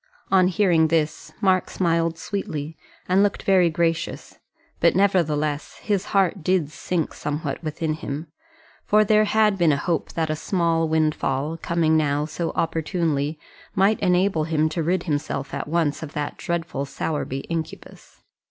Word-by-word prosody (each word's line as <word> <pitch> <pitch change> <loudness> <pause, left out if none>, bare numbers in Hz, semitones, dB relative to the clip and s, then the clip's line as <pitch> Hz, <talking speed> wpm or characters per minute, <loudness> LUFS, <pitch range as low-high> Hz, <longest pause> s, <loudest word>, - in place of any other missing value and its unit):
On 185 -2 +5
hearing 175 -4 +3
this 155 -1 -1
read - - -18
Mark 185 -1 +3
smiled 165 -2 0
sweetly, 160 -5 -4 0.3
and 185 +2 +4
looked 205 0 +1
very 185 -3 +4
gracious; 165 0 -2 0.4
but, - - +4
nevertheless, 155 -7 +1
his 205 -2 0
heart 190 -3 +1
did 180 -4 +1
sink 165 0 -2
somewhat 145 0 -4
within 155 0 -2
him, 155 0 -5 0.6
for 210 +1 +4
there 215 0 +4
had 215 -2 +2
been 170 -3 +4
a 140 - +2
hope 165 +2 -2
that 160 -2 -1
a - - 0
small 165 -1 0
windfall, 155 -2 0
coming 165 -1 +1
now 145 -1 +1
so 165 +2 -3
opportunely, 160 -2 -1 0.4
might 195 +3 +3
enable 180 -3 +2
him 155 -1 +1
to 165 +2 -2
rid 175 +2 0
himself 145 -3 -3
at - - -3
once 155 -2 0
of 155 -2 -7
that 150 -2 -3
dreadful 170 -5 -3
Sowerby 140 -2 -3
incubus. 165 0 -7
165 Hz, 150 wpm, -23 LUFS, 155-185 Hz, 0.6 s, On